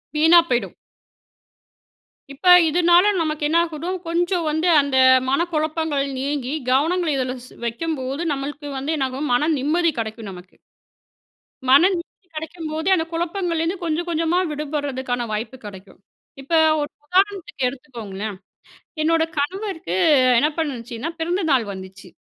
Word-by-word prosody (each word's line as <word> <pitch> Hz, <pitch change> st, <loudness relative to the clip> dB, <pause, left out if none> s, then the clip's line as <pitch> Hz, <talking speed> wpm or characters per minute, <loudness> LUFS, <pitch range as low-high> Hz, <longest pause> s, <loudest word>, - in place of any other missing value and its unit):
வீணா 320 Hz, +3 st, +6 dB
போயிடும். 245 Hz, -1 st, -1 dB, 1.6 s
இப்போ, 325 Hz, +7 st, 0 dB, 0.2 s
இதுனால 345 Hz, +2 st, +5 dB, 0.2 s
நமக்கு 310 Hz, -2 st, -2 dB
என்ன 320 Hz, +3 st, +2 dB
ஆகிடும். 335 Hz, +3 st, -4 dB
கொஞ்சம் 345 Hz, +1 st, 0 dB
வந்து 315 Hz, +3 st, 0 dB
அந்த 280 Hz, -2 st, -1 dB, 0.3 s
மனக்குழப்பங்கள் 310 Hz, -1 st, 0 dB
நீங்கி, 275 Hz, -1 st, -2 dB, 0.2 s
கவனங்கள்ல 320 Hz, +3 st, +1 dB
இதுல 255 Hz, -1 st, -2 dB, 0.3 s
வைக்கும்போது, 270 Hz, +2 st, -3 dB
நம்பளுக்கு 285 Hz, +1 st, -6 dB
வந்து 285 Hz, +4 st, -2 dB
என்னாகும்? 270 Hz, +2 st, -2 dB
மன 300 Hz, +6 st, +2 dB
நிம்மதி 325 Hz, +5 st, +1 dB
கிடைக்கும், 220 Hz, -1 st, -5 dB
நமக்கு. 180 Hz, 0 st, -13 dB, 1.1 s
மன 270 Hz, +4 st, +7 dB
நிம்மதி 360 Hz, +2 st, -8 dB
கிடைக்கும்போதே, 320 Hz, +1 st, -4 dB
அந்த 320 Hz, -3 st, -1 dB
குழப்பங்கள்லேருந்து 340 Hz, 0 st, -1 dB
கொஞ்சம், 335 Hz, +1 st, -2 dB
கொஞ்சமா 330 Hz, +1 st, 0 dB
விடுபடுறதுக்கான 280 Hz, -5 st, -3 dB
வாய்ப்பு 220 Hz, +5 st, -4 dB
கிடைக்கும். 195 Hz, -1 st, -11 dB, 0.4 s
இப்ப 275 Hz, +5 st, -7 dB, 0.3 s
ஒரு 290 Hz, 0 st, -2 dB, 0.2 s
உதாரணத்துக்கு 375 Hz, -4 st, 0 dB
எடுத்துக்கோங்களேன். 220 Hz, -7 st, -7 dB, 0.7 s
என்னோட 325 Hz, +1 st, +2 dB
கணவருக்கு 325 Hz, -, -3 dB, 0.4 s
என்ன 290 Hz, +5 st, +3 dB
பண்ணுச்சுன்னா? 250 Hz, -3 st, -4 dB
பிறந்த 350 Hz, +4 st, -1 dB
நாள் 260 Hz, -4 st, +3 dB
வந்துச்சு, 190 Hz, 0 st, -10 dB
300 Hz, 115 wpm, -21 LUFS, 260-335 Hz, 1.6 s, மன